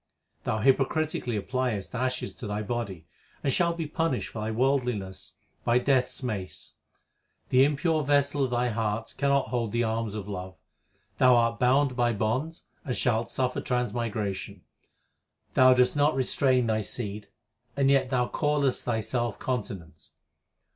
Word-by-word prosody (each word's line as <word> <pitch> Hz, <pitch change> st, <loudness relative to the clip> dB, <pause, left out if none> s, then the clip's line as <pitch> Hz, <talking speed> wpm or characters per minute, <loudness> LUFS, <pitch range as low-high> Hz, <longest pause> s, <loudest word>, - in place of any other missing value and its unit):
Thou 110 Hz, -, 0 dB
hypocritically 135 Hz, -1 st, +1 dB
appliest 115 Hz, -1 st, -2 dB
ashes 125 Hz, -5 st, -2 dB
to 110 Hz, -, -6 dB
thy 105 Hz, +1 st, -2 dB
body, 105 Hz, -7 st, -4 dB, 0.4 s
And 135 Hz, -, +1 dB
shalt 170 Hz, -1 st, +1 dB
be 165 Hz, -, -2 dB
punished 160 Hz, -3 st, -1 dB
for 110 Hz, -, -5 dB
thy 110 Hz, -, -2 dB
worldliness 120 Hz, -5 st, -1 dB, 0.3 s
by 120 Hz, +1 st, +3 dB
Death 130 Hz, 0 st, +3 dB
s 130 Hz, -, -8 dB
mace. 105 Hz, -7 st, -4 dB, 0.8 s
The 130 Hz, +1 st, +5 dB
impure 150 Hz, +3 st, +1 dB
vessel 145 Hz, 0 st, +2 dB
2 -, -, +4 dB
of -, -, -3 dB
thy 120 Hz, 0 st, +1 dB
heart 110 Hz, 0 st, -2 dB
cannot 140 Hz, -3 st, +2 dB
hold 120 Hz, -3 st, -1 dB
the 120 Hz, +1 st, +1 dB
alms 110 Hz, -1 st, -2 dB
of 105 Hz, -2 st, -5 dB
love. 95 Hz, -3 st, -6 dB, 0.6 s
Thou 125 Hz, -1 st, +6 dB
art 115 Hz, -1 st, +2 dB
bound 130 Hz, +1 st, +3 dB
by 120 Hz, -1 st, +2 dB
bonds 125 Hz, +10 st, -2 dB, 0.2 s
and 125 Hz, -5 st, -3 dB
shalt 115 Hz, -2 st, +1 dB
suffer 130 Hz, -1 st, -1 dB
transmigration. 115 Hz, -5 st, -2 dB, 0.9 s
Thou 130 Hz, 0 st, +6 dB
dost 125 Hz, +2 st, +3 dB
not 145 Hz, 0 st, +3 dB
restrain 130 Hz, -1 st, +2 dB
thy 110 Hz, -1 st, +1 dB
seed, 105 Hz, -1 st, -5 dB, 0.5 s
and 135 Hz, -1 st, +4 dB
yet 135 Hz, -2 st, +3 dB
thou 125 Hz, -2 st, +1 dB
callest 145 Hz, -3 st, 0 dB
thyself 120 Hz, 0 st, -1 dB
continent. 100 Hz, -, -5 dB
125 Hz, 150 wpm, -27 LUFS, 110-135 Hz, 0.9 s, Thou